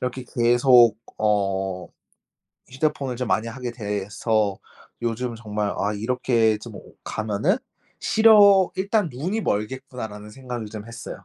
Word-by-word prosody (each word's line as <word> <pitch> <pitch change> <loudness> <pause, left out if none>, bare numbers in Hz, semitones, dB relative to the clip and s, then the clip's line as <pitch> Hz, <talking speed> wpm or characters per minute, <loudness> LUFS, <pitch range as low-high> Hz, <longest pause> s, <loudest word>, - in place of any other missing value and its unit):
이렇게 125 +1 -3
계속 120 -1 +5 0.2
어 95 -3 0 0.8
휴대폰을 135 -1 -2
좀 125 -1 -3
많이 110 +1 +1
하게 120 +1 -5
돼서 105 -1 -1 0.4
요즘 120 +1 -2
정말 105 -2 -3
아 105 +1 0
'이렇게 115 0 +1
좀 110 0 -10 0.3
가면은 110 - -1 0.4
시력 205 -4 +6
일단 200 0 +1
눈이 170 - -3
멀겠구나.' 125 - -3
라는 105 0 -11
생각을 125 -1 -7
좀 105 0 -8
했어요. 115 -4 -9
115 Hz, 255 characters per minute, -23 LUFS, 105-130 Hz, 0.8 s, 시력